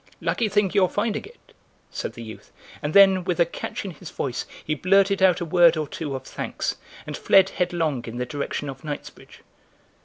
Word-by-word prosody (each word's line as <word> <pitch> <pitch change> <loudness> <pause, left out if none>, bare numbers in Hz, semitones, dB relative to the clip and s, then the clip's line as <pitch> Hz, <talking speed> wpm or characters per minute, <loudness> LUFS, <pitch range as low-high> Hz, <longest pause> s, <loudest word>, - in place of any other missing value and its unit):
"Lucky 225 -3 0
thing 205 -2 +2
your 190 -3 +4
finding 210 +3 -1
it," 470 +4 -18 0.4
said - - -4
the 115 - -9
youth, 110 -1 -11 0.3
and 150 +1 -3
then, 195 -2 +7
with 180 -1 -2
a 170 - +6
catch 170 - -6
in 195 - -4
his 170 +1 -11
voice, 125 -3 -4 0.2
he 155 - 0
blurted 195 +4 +3
out 185 -2 +5
a - - -1
word 170 0 +5
or 155 -1 -2
two 145 -1 -5
of 130 - -6
thanks - - -4 0.3
and - - -5
fled 195 -1 +5
headlong 165 -8 -1
in 115 +1 -7
the 125 - -2
direction 145 +3 -4
of 135 -1 -8
Knightsbridge. 150 -2 -8
175 Hz, 195 wpm, -24 LUFS, 145-195 Hz, 0.4 s, then